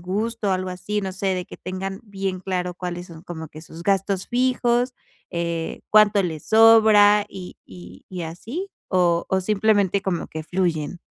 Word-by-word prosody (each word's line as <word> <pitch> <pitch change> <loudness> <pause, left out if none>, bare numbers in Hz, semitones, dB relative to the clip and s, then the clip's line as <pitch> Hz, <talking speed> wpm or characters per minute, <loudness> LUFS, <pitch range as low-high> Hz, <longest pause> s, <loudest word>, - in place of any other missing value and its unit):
gusto, 210 +4 -2
o - - +2
algo 185 0 -1
así? 210 +3 -3
No 190 -1 -3
sé, 195 +1 -2
de 180 - -3
que - - -11
tengan 190 +1 -5
bien 195 -3 -3
claro 180 -1 -2
cuáles 175 0 -6
son 165 -1 -12
como 160 -4 -7
que 155 - -11
sus 165 +1 -11
gastos 195 0 0
fijos, 245 0 +1 0.4
eh, 170 -1 -3
cuánto 210 -1 +5
les 160 -4 -4
sobra, 215 -2 +6
y 185 -2 -9
y 90 0 -13
y 180 -2 -5
así. 230 - -6 0.2
¿O 175 -2 +2
o 190 0 +1
simplemente 205 -1 +2
como 185 -4 -2
que 160 0 -6
fluyen? 170 -2 -1
190 Hz, 175 wpm, -23 LUFS, 175-210 Hz, 0.4 s, sobra